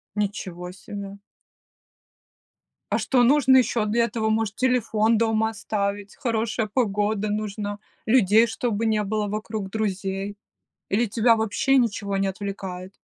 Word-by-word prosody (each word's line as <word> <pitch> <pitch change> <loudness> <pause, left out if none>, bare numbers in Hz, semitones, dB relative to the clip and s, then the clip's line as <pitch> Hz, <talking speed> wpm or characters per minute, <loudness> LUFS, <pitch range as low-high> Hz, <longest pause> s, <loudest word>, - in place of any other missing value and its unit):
Ничего 185 -4 -3
себе. 200 +1 -8 1.8
А - - +3
что 255 -2 +2
нужно 265 +1 +5
ещё 235 -3 +2
для 230 +2 +2
этого? 225 -2 -1
Может, 220 -1 0
телефон 230 -3 +2
дома 220 0 +2
оставить? 205 -1 -3
Хорошая 230 -2 -1
погода 210 -2 0
нужна, 205 -1 -3 0.3
людей 220 -1 +5
чтобы 230 -1 -2
не 215 -1 +2
было 210 0 -1
вокруг, 215 -1 -4
друзей? 195 -1 -3 0.5
Или 220 +5 +2
тебя 230 +2 +3
вообще 225 +5 +1
ничего 205 -5 0
не 195 0 +1
отвлекает? 190 -1 -6
215 Hz, 125 wpm, -24 LUFS, 200-230 Hz, 1.8 s, нужно